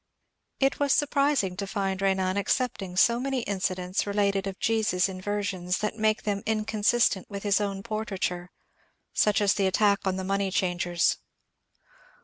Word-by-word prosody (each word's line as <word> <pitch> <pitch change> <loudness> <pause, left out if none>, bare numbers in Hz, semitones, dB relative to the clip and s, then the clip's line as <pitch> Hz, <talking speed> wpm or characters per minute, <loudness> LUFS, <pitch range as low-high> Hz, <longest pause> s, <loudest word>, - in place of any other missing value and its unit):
It 270 0 +1
was 285 -2 +3
surprising 280 -9 +1
to 200 - -3
find 195 -1 -2
Benan 190 -1 +1
accepting 200 -3 -1
so 235 +5 +4
many 265 0 -1
incidents 185 -2 -2
related 200 -1 0
of 195 -1 -5
Jesus 215 -5 +1
in 185 -1 -7
versions 195 -3 -2
that 210 +1 -2
make 215 0 +1
them 200 -1 -1
inconsistent 215 -1 +1
with 200 -1 -6
his 205 0 +2
own 195 -1 -3
portraiture, 195 -5 -3 0.3
— - - -42
such 210 0 +2
as 205 -1 +4
the 195 -2 +1
attack 200 +1 +2
on 185 - +1
the 190 - -4
money 195 +1 0
changers. 175 -2 +1
200 Hz, 155 wpm, -27 LUFS, 190-215 Hz, 0.3 s, so